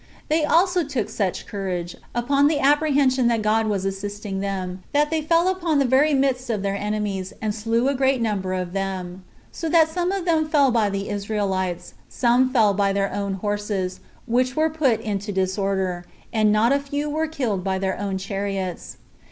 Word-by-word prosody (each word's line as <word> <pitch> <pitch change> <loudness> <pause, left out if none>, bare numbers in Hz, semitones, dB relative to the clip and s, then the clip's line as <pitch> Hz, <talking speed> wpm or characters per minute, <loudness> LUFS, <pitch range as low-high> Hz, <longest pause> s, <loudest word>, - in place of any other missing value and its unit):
They 310 +1 +2
also 355 +3 +3
took 270 -7 -3
such 195 -4 -2
courage, 185 -4 -4 0.2
upon 275 +4 +3
the 305 0 +2
apprehension 280 -3 +3
that 230 -2 +1
God 220 +1 +2
was 200 -3 -1
assisting 195 0 -4
them, 190 -2 -3
that 295 +1 +2
they 320 -1 +1
fell 330 +3 +2
upon 350 -5 +1
the 275 - +3
very 275 +4 +4
midst 265 -2 0
of 210 -4 -1
their 200 0 -1
enemies, 205 -2 -3
and 215 -1 -2
slew 230 +3 0
a 280 - +2
great 265 -1 +2
number 200 -5 -1
of 180 -1 -4
them; 190 -2 -4 0.3
so 330 - -4
that 320 -1 +5
some 355 +2 -1
of 390 -2 -2
them 315 -3 +1
fell 285 -4 +4
by 225 -3 +2
the 195 0 -3
Israelites, 195 -4 -2 0.2
some 250 +1 +2
fell 220 -6 +4
by 200 0 +1
their 195 0 -1
own 200 -1 -2
horses, 205 -2 -2 0.3
which 255 +2 +1
were 315 0 +2
put 275 -8 +1
into 205 -1 -3
disorder, 190 -1 -1 0.3
and 215 -2 +3
not 220 +5 +3
a 280 - +2
few 285 +1 -3
were 310 +2 -1
killed 245 - -2
by 190 0 0
their 190 0 -2
own 200 -2 -2
chariots. 195 -1 -4
215 Hz, 185 wpm, -23 LUFS, 195-280 Hz, 0.3 s, that